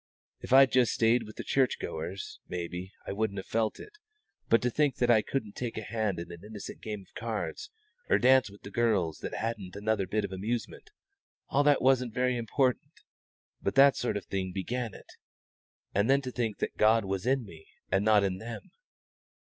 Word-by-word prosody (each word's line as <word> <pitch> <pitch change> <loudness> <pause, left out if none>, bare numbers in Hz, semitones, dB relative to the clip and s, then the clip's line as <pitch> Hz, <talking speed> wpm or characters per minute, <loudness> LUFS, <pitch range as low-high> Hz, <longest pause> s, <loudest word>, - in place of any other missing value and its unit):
If - - -9
I'd 135 0 +7
just 125 -3 +3
stayed 115 0 +2
with 110 - -11
the - - -6
church 130 -2 +2
goers, 85 +4 -6
maybe 90 +1 -5
I - - -4
wouldn't 100 0 -1
have 95 - -5
felt 110 -1 -1
it; 425 0 -12 0.5
but 115 - +6
to 125 - +1
think 145 0 +2
that 120 -1 +2
I 110 -2 +5
couldn't 110 -3 -3
take 120 -2 -4
a 110 - -3
hand 105 -4 -2
in 85 - -7
an 85 +1 -10
innocent 105 -1 -8
game 105 -3 -6
o' - - -30
cards, 105 -8 -4 0.4
or - - +5
dance 130 -1 +5
with 100 +1 -16
the 100 - -9
girls 100 -9 +1
that - - -5
hadn't 105 -5 -4
had 100 - -8
another 105 -3 +1
bit 105 +2 0
of 100 - -7
amusement 110 - -4 0.6
all 140 - +3
that 145 -1 +4
wasn't 125 -3 +3
very 125 0 +1
important, 125 +2 0 0.7
but 100 - -1
that 135 0 +7
sort 120 - -1
of 100 - -7
thing 95 -1 -3
began 115 +5 -3
it. - - -13 0.9
And 100 +5 +2
then 140 +1 +4
to 130 - -4
think 115 -4 -2
that - - -3
God 110 0 +4
was 95 +3 -3
in 130 -2 +2
me 80 -5 -13 0.2
and 95 +2 +2
not 105 -1 +5
in 95 -1 -1
them! 110 -1 -8
110 Hz, 205 wpm, -29 LUFS, 100-125 Hz, 0.9 s, I'd